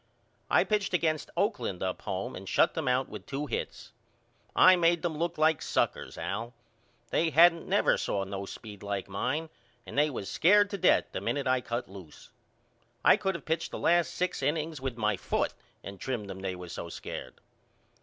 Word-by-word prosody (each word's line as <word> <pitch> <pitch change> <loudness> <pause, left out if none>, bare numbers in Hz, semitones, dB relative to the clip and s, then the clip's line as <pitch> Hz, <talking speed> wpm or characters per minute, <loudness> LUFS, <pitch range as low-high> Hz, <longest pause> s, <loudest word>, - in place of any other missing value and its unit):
I - - +5
pitched 205 -3 0
against 155 -3 0
Oakland 200 - -1
up 95 -1 -2
home 95 -2 -4
and 95 +1 -8
shut - - +3
them 160 -5 -3
out 125 +1 +2
with - - -9
two 140 +2 -3
hits. 120 -4 -5 0.6
I 185 - +8
made 170 -1 +2
them 170 -3 -1
look 170 +2 -2
like 155 -1 +3
suckers - - -1
Al. 115 +5 -4 0.6
They 165 - +2
hadn't 165 +2 +5
never - - +3
saw 100 - -1
no 100 0 -5
speed 105 -2 -9
like 100 -2 -3
mine 150 +11 -2 0.3
and 95 - -9
they 150 +2 +3
was 110 -8 -5
scared 205 - +4
to 200 - -2
death - - +4
the - - -4
minute 140 -1 -1
I 130 -1 +2
cut 120 0 -3
loose. 95 -5 -13 0.7
I - - +8
could 195 -1 -1
of - - -7
pitched 160 +1 -1
the - - -6
last 175 0 +3
six 180 -3 -1
innings 150 +1 -1
with 130 -3 -3
my 105 -3 +1
foot - - -1 0.3
and 100 -1 -8
trimmed 120 -4 -3
them 95 - -8
they 95 -1 -3
was 90 -1 -8
so 85 - -6
scared. - - -7
135 Hz, 190 wpm, -29 LUFS, 100-165 Hz, 0.7 s, I